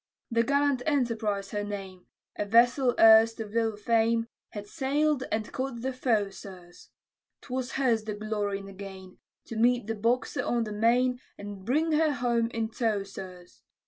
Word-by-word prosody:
The 230 0 +3
gallant 280 +1 +1
Enterprise 225 -8 0
her 205 0 -2
name, 195 -3 -7 0.3
A - - -1
vessel 240 +4 +4
erst 225 0 +7
of 215 -2 -5
little 225 -2 0
fame, 230 +1 +2 0.2
Had 205 -1 -7
sail'd 275 +4 0
and 215 0 -2
caught 260 -3 -4
the 265 0 -2
foe, 225 -6 0
sirs; 180 -2 -13 0.5
'Twas 255 -1 -4
hers 235 -5 +1
the 215 -1 -4
glory 210 -1 -2
and 195 0 -10
the 195 - -10
gain, 190 -1 -10 0.3
To 230 - -8
meet 245 0 +3
the 225 - -2
Boxer 230 +2 0
on 240 -1 0
the 215 - -5
main, 245 +4 +2 0.2
And 205 -1 -8
bring 310 +7 +1
her 310 -1 +3
home 240 -2 0
in 225 -1 -2
tow, 220 -3 0
sirs. 185 -2 -11
225 Hz, 170 wpm, -28 LUFS, 205-250 Hz, 0.5 s, erst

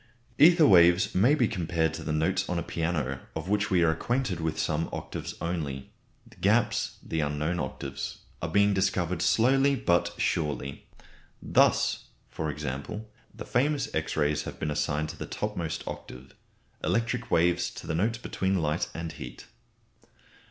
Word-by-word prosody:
Ether 165 +1 +7
waves 90 +1 +6
may 120 +11 +4
be 125 -6 +2
compared 85 -6 0
to 80 0 -6
the - - -3
notes 80 +5 0
on 90 - -1
a 85 - -1
piano, 80 -6 -2 0.2
of 80 +2 -4
which 105 +1 +1
we 90 -4 +3
are 80 - +4
acquainted 120 +2 -1
with 80 -1 -2
some 80 0 -1
octaves - - -5
only. 75 -6 -4 0.3
The - - -19
gaps, - - +1
the 80 - -3
unknown 75 +3 -1
octaves, 70 -1 -5 0.2
are 80 - -2
being 100 +3 +4
discovered 95 -3 0
slowly 135 +4 +4
but 85 -8 +1
surely. 75 -3 -2 0.5
Thus, - - +2 0.3
for 80 -1 -3
example, 75 +9 -5 0.2
the 110 0 -9
famous 140 +2 0
X 80 0 -2
rays 75 -1 +2
have - - -8
been 75 - -2
assigned 75 +1 -1
to 80 - -8
the - - -6
topmost - - -3
octave; 65 +1 -8 0.5
electric 115 +2 0
waves 85 +1 +2
to - - -10
the - - -2
notes 110 +8 +1
between 95 -4 -1
light 80 +2 0
and 85 -1 -4
heat. - - -9
85 Hz, 160 wpm, -28 LUFS, 75-105 Hz, 0.5 s, Ether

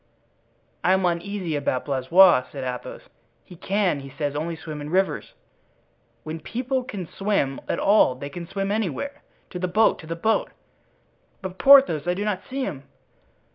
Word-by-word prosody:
"I 185 - +4
am 190 -1 +2
uneasy 175 -1 -2
about 140 -3 -1
Blaisois," 140 +2 +5
said 135 -2 -6
Athos; 125 -1 -6 0.4
"he 180 - -14
can, 190 -3 0
he 135 0 -9
says, 145 +1 -3
only 165 +3 -3
swim 155 -2 -8
in 145 - -6
rivers." 190 +3 -1 0.9
"When 160 +1 -6
people 255 - -2
can 200 -8 -6
swim 195 -10 -1
at - - 0
all 200 -10 +4
they 140 +2 -7
can 170 +3 -8
swim 195 +1 -3
anywhere. 220 - -3 0.3
To 180 - -5
the 180 - -1
boat! 215 +5 +3
to 160 - -11
the 165 - -3
boat!" 220 +7 0 0.9
"But 185 -1 -6
Porthos, 265 - +6
I 180 - +1
do 205 +2 -3
not 200 -3 -1
see 270 +1 -3
him." 155 - -4
180 Hz, 170 wpm, -24 LUFS, 150-205 Hz, 0.9 s, Porthos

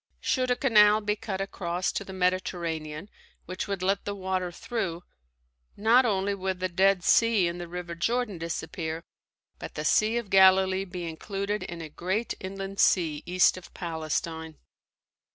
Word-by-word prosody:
Should 255 -1 0
a 250 - +3
canal 215 -5 +5
be 210 0 0
cut 195 -2 -4
across 180 -2 -2
to - - -3
the 190 - -10
Mediterranean 175 -3 -2 0.4
which 185 +1 -5
would 200 -2 -3
let 195 +2 +1
the 205 - -4
water 185 -2 -2
through, 180 -4 -4 0.7
not 235 +4 +5
only 200 -1 0
would 190 -1 -3
the 185 0 -1
Dead 190 +1 +3
Sea 225 -4 +4
and 175 +1 -4
the 175 - -6
River 175 0 -6
Jordan 215 +2 -1
disappear, 165 0 -4 0.6
but - - -8
the 150 - -4
Sea 215 +8 +3
of 235 -5 -4
Galilee 190 0 +5
be 180 -2 -6
included 200 +5 -3
in 170 -1 -6
a - - -6
great 190 +9 -2
inland 195 +1 -6
sea 160 -5 +3
east 180 +1 +4
of 180 - -12
Palestine. 160 -1 -4
185 Hz, 160 wpm, -27 LUFS, 170-200 Hz, 0.7 s, canal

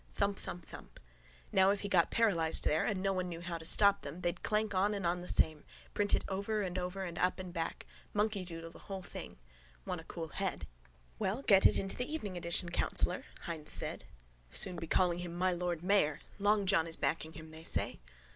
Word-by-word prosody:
Thump, 200 0 0
thump, 175 -2 -6
thump. - - -12 0.5
Now 190 -1 +5
if 200 0 +1
he 205 - -3
got 180 -4 +4
paralysed 175 -9 +2
there 155 +1 +2
and 195 -3 -1
no 195 0 +2
one 185 -1 -2
knew 165 -1 -6
how 170 -1 -4
to 160 - -9
stop 200 +3 +5
them 150 +5 -7
they'd 175 -1 -1
clank 215 -1 0
on 200 +3 +2
and 195 -3 -3
on 175 +1 +1
the 180 - -8
same, 155 -2 +2 0.3
print 205 0 +3
it - - -2
over 200 +2 -1
and 185 -1 -2
over 180 +2 -3
and 175 -2 -5
up 180 - +2
and 185 -2 -7
back. 165 -2 -3 0.3
Monkeydoodle 185 -6 -2
the - - -13
whole 190 -1 -4
thing. - - -8 0.5
Want 170 - -3
a - - -17
cool 165 -2 -6
head. 185 - -3 0.5
—Well, 220 +8 -1
get 195 -6 +7
it - - +3
into 195 0 -1
the 250 +4 -3
evening 210 -12 -4
edition, 175 0 -1
councillor, 175 +1 +1 0.2
Hynes 160 -3 -1
said. - - +1 0.4
Soon 175 - 0
be 165 - -5
calling 175 0 +2
him 175 -1 -5
my 185 +1 +2
lord 175 -2 -2
mayor. 180 -6 +3 0.2
Long 205 0 +3
John 185 -4 +4
is 165 - 0
backing 160 -1 -1
him, 160 0 -10
they 160 0 -11
say. - - +2
180 Hz, 215 wpm, -34 LUFS, 170-200 Hz, 0.5 s, get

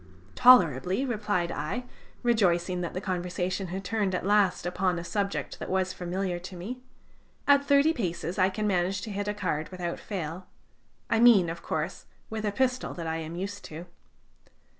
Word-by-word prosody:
"Tolerably," 190 - +5
replied 210 -8 -1
I, 155 +13 -3 0.4
rejoicing 180 -6 +2
that 175 - -4
the - - -1
conversation 180 +1 -2
had 190 +3 -5
turned 200 -2 0
at 180 - -3
last 205 -3 +3
upon 180 0 0
a 170 - -4
subject 200 +2 -2
that - - -6
was 185 0 0
familiar 180 0 -3
to 185 +1 -9
me. 215 +9 -6 0.7
"At 280 0 +6
thirty 285 +3 +4
paces 180 - -3
I 185 +1 +5
can 210 +3 -3
manage 190 0 +1
to 215 - -5
hit 205 +1 -3
a 210 - 0
card 165 -6 -2
without 180 -2 -4
fail, 180 -2 -5 0.6
I 225 - +2
mean, 215 -8 +6
of 170 - -7
course, - - -3 0.2
with 220 -1 -3
a 205 - +1
pistol 255 +3 0
that 170 - -5
I 160 0 -1
am 165 +1 -6
used 200 +3 -5
to." 160 +3 -8
185 Hz, 175 wpm, -28 LUFS, 175-210 Hz, 0.7 s, At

